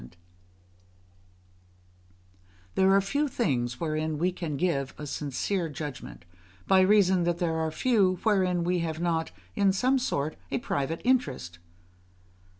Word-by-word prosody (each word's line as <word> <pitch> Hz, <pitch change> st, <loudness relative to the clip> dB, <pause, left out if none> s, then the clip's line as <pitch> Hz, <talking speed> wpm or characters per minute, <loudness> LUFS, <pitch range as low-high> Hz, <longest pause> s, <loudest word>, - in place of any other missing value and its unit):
There 190 Hz, 0 st, +4 dB
are 195 Hz, +1 st, +5 dB
few 285 Hz, +10 st, 0 dB
things 125 Hz, -, -1 dB
wherein 155 Hz, -1 st, -2 dB
we 180 Hz, +4 st, +1 dB
can 165 Hz, -5 st, -4 dB
give 140 Hz, -5 st, -1 dB
a 150 Hz, -, -6 dB
sincere 155 Hz, +6 st, -2 dB
judgment, 145 Hz, -, -7 dB, 0.4 s
by 190 Hz, -1 st, +5 dB
reason 190 Hz, -2 st, +4 dB
that 175 Hz, -1 st, 0 dB
there 170 Hz, -2 st, 0 dB
are 160 Hz, 0 st, 0 dB
few 195 Hz, 0 st, +2 dB
wherein 185 Hz, -5 st, +2 dB
we 180 Hz, +1 st, +1 dB
have 160 Hz, -1 st, -3 dB
not, 165 Hz, -1 st, 0 dB, 0.3 s
in 200 Hz, -1 st, +3 dB
some 255 Hz, +8 st, +2 dB
sort, 155 Hz, -, -2 dB
a -, -, -1 dB
private 160 Hz, -, -2 dB
interest. 135 Hz, -, 0 dB
175 Hz, 130 wpm, -28 LUFS, 150-195 Hz, 0.4 s, are